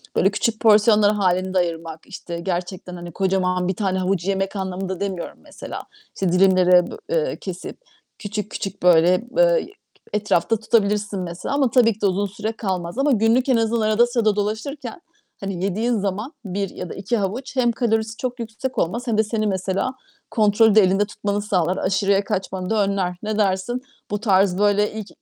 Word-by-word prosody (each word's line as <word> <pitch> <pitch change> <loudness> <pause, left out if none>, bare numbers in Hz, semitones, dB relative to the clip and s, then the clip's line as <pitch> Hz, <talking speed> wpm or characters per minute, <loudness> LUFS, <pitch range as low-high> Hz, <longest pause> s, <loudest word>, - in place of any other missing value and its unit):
Böyle 195 +2 +3
küçük 220 +1 -1
porsiyonlar 210 -1 +5
hâlinde 185 -1 +1
ayırmak, 165 -2 -2
işte, 170 -1 -7
gerçekten, 180 +1 -4
hani, 175 0 -8
kocaman 185 0 0
1 190 - -1
tane 190 -1 -1
havucu 185 0 -1
yemek 195 +1 -1
anlamında 190 -1 -4
demiyorum 190 -3 -4
mesela. - - -8 0.3
İşte 185 -3 0
dilimlere, 180 -1 +5
b - - -6
eee, - - 0
kesip - - -7 0.4
küçük, 210 0 -5
küçük 195 -1 -5
böyle, 180 +4 +5
eee, - - +4 0.5
etrafta 210 0 +1
tutabilirsin 210 -2 +1
mesela. 180 +10 -4
Ama 270 -5 +2
tabii 230 -4 +4
ki 210 - -23
de - - +1
uzun 195 +1 +1
süre 210 +3 -4
kalmaz. 185 -3 -4
Ama 275 +1 +2
günlük 230 +3 +3
en 250 - +4
azından 225 0 +1
arada 215 +3 +3
sırada 225 -4 +1
dolaşırken, 225 +7 -4 0.4
hani, 195 -2 -4
yediğin 225 +5 0
zaman 205 - -3
1 195 0 -2
ya 180 - -7
da - - -6
2 195 +4 -1
havuç 225 +8 -3
hem 240 -2 +3
kalorisi 225 -2 -1
çok 250 -1 -4
yüksek 230 +3 -5
olmaz 235 +9 -1
hem 220 -2 +1
de 220 - +4
seni 215 0 -1
mesela 195 +6 -1 0.4
kontrolü 215 -1 +4
de 215 - +8
elinde 195 +2 +3
tutmanı 205 0 -3
sağlar. 185 -3 0
Aşırıya 195 +1 +1
kaçmanı 190 -1 -3
da 215 -2 +2
önler. 190 -2 -1
Ne 215 0 -2
dersin? 205 +5 0 0.3
Bu 205 - -1
tarz, 195 -4 +3
böyle 205 0 +2
ilk 215 -2 -6
200 Hz, 175 wpm, -22 LUFS, 185-220 Hz, 0.5 s, de